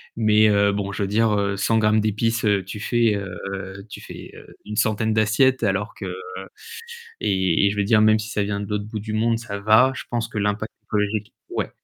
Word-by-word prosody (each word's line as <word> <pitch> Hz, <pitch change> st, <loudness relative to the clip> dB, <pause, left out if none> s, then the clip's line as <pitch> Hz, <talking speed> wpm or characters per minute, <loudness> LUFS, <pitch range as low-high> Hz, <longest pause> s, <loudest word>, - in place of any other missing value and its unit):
mais 110 Hz, -1 st, +4 dB
heu, 100 Hz, -1 st, +3 dB
bon, 100 Hz, 0 st, -3 dB
je 100 Hz, -, -2 dB
veux -, -, -1 dB
dire, 110 Hz, +1 st, +2 dB
heu, 100 Hz, -1 st, -1 dB
100 110 Hz, +3 st, +1 dB
grammes 110 Hz, 0 st, +3 dB
d'épices, 110 Hz, +2 st, 0 dB
heu, 100 Hz, -2 st, +2 dB
tu 95 Hz, +3 st, -8 dB
fais, 115 Hz, 0 st, +1 dB
heu, 100 Hz, 0 st, -6 dB
tu -, -, -9 dB
fais, -, -, -10 dB
heu, -, -, -13 dB, 0.2 s
une 105 Hz, 0 st, -6 dB
centaine 110 Hz, 0 st, +1 dB
d'assiettes 115 Hz, +4 st, +2 dB
alors 105 Hz, +1 st, -1 dB
que -, -, -7 dB, 1.2 s
et 95 Hz, 0 st, +2 dB
et -, -, +2 dB
je 105 Hz, -, -6 dB
veux 100 Hz, -, +2 dB
dire 110 Hz, +2 st, +4 dB
même 110 Hz, 0 st, +5 dB
si 110 Hz, +1 st, -6 dB
ça 105 Hz, -, -1 dB
vient 100 Hz, 0 st, -2 dB
de 100 Hz, -, -4 dB
l'autre 105 Hz, -1 st, -3 dB
bout 110 Hz, 0 st, -5 dB
du 105 Hz, +1 st, -6 dB
monde, 115 Hz, +1 st, +1 dB
ça 105 Hz, -4 st, -6 dB
va. 110 Hz, +6 st, +5 dB
Je -, -, -7 dB
pense 115 Hz, -1 st, -2 dB
que 105 Hz, -, -4 dB
l'impact 105 Hz, +1 st, -1 dB
écologique 105 Hz, 0 st, -2 dB, 0.2 s
ouais. -, -, -2 dB
105 Hz, 225 wpm, -22 LUFS, 100-110 Hz, 1.2 s, même